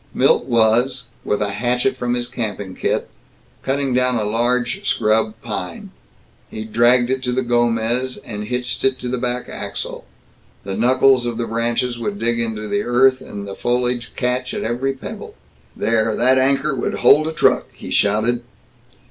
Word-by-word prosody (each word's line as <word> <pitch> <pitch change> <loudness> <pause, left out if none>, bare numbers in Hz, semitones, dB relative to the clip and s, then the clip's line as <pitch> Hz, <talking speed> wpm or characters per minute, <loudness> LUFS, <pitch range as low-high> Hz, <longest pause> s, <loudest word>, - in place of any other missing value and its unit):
Milt - - +3
was, 120 +2 +2 0.2
with 105 0 0
a 100 - -2
hatchet 125 +5 0
from 125 -1 -1
his 120 0 -2
camping 105 -6 -4
kit, - - -1 0.5
cutting 135 -1 -1
down 125 0 +2
a 110 - 0
large 120 +3 0
scrub 110 0 +1
pine. 90 -6 -5 0.6
He 110 0 -6
dragged 120 +3 +3
it 130 0 0
to 125 -1 -2
the 130 +1 0
Gomez 120 +1 +1
and 105 -2 -7
hitched 125 +2 -2
it 135 -1 +2
to 125 - -6
the 125 0 -2
back 125 0 -2
axle. - - -6 0.6
The 95 -1 -4
knuckles 125 +2 +4
of 120 -1 -3
the 120 - -1
branches 120 +2 -1
would 105 -3 -3
dig 115 +2 0
into 110 -2 -2
the 205 - 0
earth, 130 -2 +3
the 100 -6 -7
foliage 120 0 -1
catch 125 0 -1
at - - -3
every 125 +4 -1
pebble. 135 - -9 0.4
"There! 110 0 +1
That 130 +2 +4
anchor 135 +2 +2
would - - -2
hold 150 +5 +5
a - - -1
truck!" 160 - +2
he - - -9
shouted. 110 +4 +2
120 Hz, 165 wpm, -20 LUFS, 110-125 Hz, 0.6 s, hold